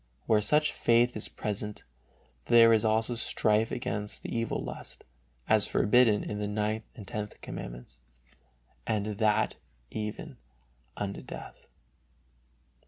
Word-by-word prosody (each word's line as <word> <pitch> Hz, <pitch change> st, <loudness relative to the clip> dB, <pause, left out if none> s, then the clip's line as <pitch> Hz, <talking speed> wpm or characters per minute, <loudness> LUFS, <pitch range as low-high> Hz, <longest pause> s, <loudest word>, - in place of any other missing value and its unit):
Where 110 Hz, -2 st, +3 dB
such 150 Hz, +7 st, +2 dB
faith 120 Hz, +1 st, +3 dB
is 110 Hz, -, 0 dB
present 105 Hz, 0 st, -4 dB, 0.6 s
there 115 Hz, -1 st, +7 dB
is 110 Hz, -, +3 dB
also 110 Hz, +2 st, +2 dB
strife 110 Hz, -1 st, +1 dB
against 105 Hz, -4 st, -3 dB
the -, -, -5 dB
evil 115 Hz, -1 st, -1 dB
lust, -, -, -7 dB, 0.4 s
as -, -, +4 dB
forbidden 110 Hz, -1 st, +4 dB
in 105 Hz, -, -4 dB
the 105 Hz, -, -1 dB
Ninth 105 Hz, +1 st, -1 dB
and 105 Hz, -6 st, -10 dB
Tenth 105 Hz, -1 st, -5 dB
Commandments, -, -, -8 dB, 0.9 s
and 105 Hz, -2 st, 0 dB
that 110 Hz, 0 st, +2 dB, 0.3 s
even 105 Hz, -1 st, -5 dB, 0.6 s
unto 100 Hz, -1 st, -4 dB
death. -, -, -10 dB
110 Hz, 120 wpm, -29 LUFS, 105-115 Hz, 0.9 s, there